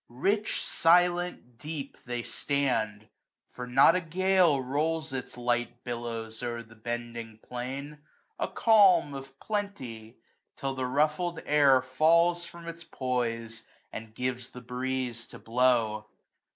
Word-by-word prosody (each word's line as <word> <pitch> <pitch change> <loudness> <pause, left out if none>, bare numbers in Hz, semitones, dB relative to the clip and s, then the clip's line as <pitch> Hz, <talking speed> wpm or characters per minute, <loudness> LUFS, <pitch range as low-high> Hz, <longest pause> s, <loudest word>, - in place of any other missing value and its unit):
AUTUMN 120 - -18
12$ - - -12
Rich, 210 +2 +1
silent, 175 -6 +2
deep, 150 0 -5
they 120 -1 -2
stand; 110 -8 -1 0.4
for 125 0 -7
not 135 +7 +6
a 185 - +1
gale 180 -2 +3
Rolls 155 +3 -1
its 125 -2 -5
light 120 0 -1
billows 115 -2 -5
o'er 120 -1 -3
the 115 0 -17
bending 115 0 -5
plain: 135 +4 -5 0.4
A - - 0
calm 190 -9 +5
of 135 0 -9
plenty! 130 - -5 0.4
till 135 -1 -3
the 130 -1 -2
ruffled 155 +5 +1
air 140 -3 +5
Falls 170 +6 +3
from 170 -1 -11
its 170 0 -7
poise, 115 -6 -2 0.3
and 110 0 -8
gives 125 0 -3
tlie 125 -1 -11
breeze 125 -1 -3
to - - -11
blow. 115 -3 +1
130 Hz, 135 wpm, -29 LUFS, 120-160 Hz, 0.4 s, not